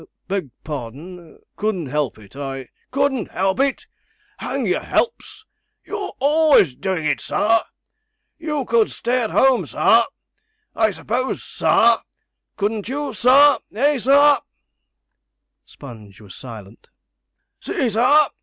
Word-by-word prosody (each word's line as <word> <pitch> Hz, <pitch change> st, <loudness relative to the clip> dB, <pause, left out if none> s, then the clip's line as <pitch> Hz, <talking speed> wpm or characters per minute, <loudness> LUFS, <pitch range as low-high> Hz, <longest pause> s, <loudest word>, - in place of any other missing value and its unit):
'Beg 190 Hz, -6 st, -3 dB
pardon 155 Hz, +5 st, -8 dB, 0.2 s
couldn't 205 Hz, -6 st, -2 dB
help 145 Hz, -3 st, -2 dB
it; 105 Hz, +2 st, -17 dB
I 135 Hz, -2 st, -6 dB
' -, -, -42 dB
'Couldn't 275 Hz, -3 st, 0 dB
help 190 Hz, +4 st, -1 dB
it. 275 Hz, 0 st, 0 dB, 0.5 s
Hang -, -, -3 dB
your -, -, +1 dB
helps 435 Hz, -2 st, -2 dB, 0.4 s
you're 410 Hz, -1 st, -6 dB
always 290 Hz, -, +4 dB
doing 185 Hz, +1 st, -3 dB
it, 150 Hz, -, 0 dB
sir. 225 Hz, +2 st, +2 dB, 0.8 s
You 300 Hz, -4 st, -3 dB
could 230 Hz, -2 st, +2 dB
stay 245 Hz, 0 st, -1 dB
at 220 Hz, -, -2 dB
home, 265 Hz, -1 st, +3 dB
sir -, -, +4 dB, 0.7 s
I 220 Hz, -1 st, +3 dB
s'pose, 240 Hz, +6 st, -3 dB
sir -, -, +3 dB, 0.6 s
couldn't 210 Hz, +1 st, -2 dB
you, 290 Hz, +2 st, -3 dB
sir? 280 Hz, +4 st, +5 dB, 0.2 s
eh, 285 Hz, +4 st, +2 dB
sir?' 280 Hz, +4 st, +5 dB, 1.3 s
Sponge 110 Hz, -7 st, -13 dB
was 100 Hz, -4 st, -13 dB
silent. 110 Hz, -2 st, -12 dB, 0.7 s
'See, 265 Hz, -, -2 dB
sir!' 250 Hz, +8 st, +4 dB
220 Hz, 120 wpm, -20 LUFS, -, 1.3 s, sir